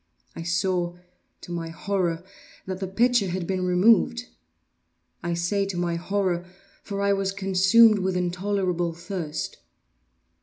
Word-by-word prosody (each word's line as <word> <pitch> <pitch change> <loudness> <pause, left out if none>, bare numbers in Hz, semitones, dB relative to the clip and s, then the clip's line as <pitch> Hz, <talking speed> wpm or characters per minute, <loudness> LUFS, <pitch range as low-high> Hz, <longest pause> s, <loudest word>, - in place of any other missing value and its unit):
I - - -6
saw, 175 0 0 0.5
to - - -10
my 170 -1 -3
horror, 175 -1 -1 0.4
that 185 -1 -4
the 190 - -3
pitcher 235 +2 +2
had 180 0 -3
been 185 +1 -1
removed. 225 +6 +4 1.0
I 170 0 -2
say 175 +4 0
to 190 -2 -4
my 175 -1 0
horror—for 190 +2 -3
I 200 0 +3
was 195 -1 0
consumed 195 +3 +5
with 185 -1 0
intolerable 180 -1 -1
thirst. 170 -3 -5
185 Hz, 125 wpm, -25 LUFS, 175-200 Hz, 1.0 s, consumed